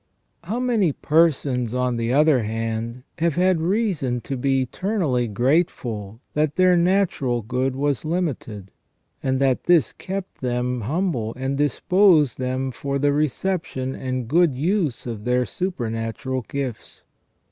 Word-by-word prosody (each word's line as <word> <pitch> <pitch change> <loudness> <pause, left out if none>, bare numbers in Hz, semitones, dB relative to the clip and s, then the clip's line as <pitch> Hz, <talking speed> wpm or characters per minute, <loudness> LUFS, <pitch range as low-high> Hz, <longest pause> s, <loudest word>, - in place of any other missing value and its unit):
How 220 +7 -2
many 225 - +2
persons, 135 -7 +1
on 125 -1 0
the 115 +1 -1
other 145 -1 +4
hand, 115 +2 -3 0.2
have 165 -2 +1
had 180 -1 +2
reason 175 - 0
to 135 - -4
be 135 +1 +1
eternally 140 - -1
grateful 115 - -1
that 150 0 0
their 185 -1 +5
natural 170 - +1
good 130 +4 -1
was 140 0 0
limited, 140 - -3 0.5
and 130 -1 0
that 135 -2 +1
this 175 -4 +4
kept 190 0 -6
them 125 -1 -1
humble 145 - -1
and 130 +2 -2
disposed 150 - +3
them 130 +1 -2
fbr 140 +3 -3
the 145 +1 +2
reception 150 -3 -1
and 130 -3 -3
good 165 +1 +3
use 160 - 0
of 115 -4 -5
their 125 +1 +1
supernatural 125 -6 -3
gifts. 135 -5 -5
135 Hz, 135 wpm, -23 LUFS, 125-170 Hz, 0.5 s, their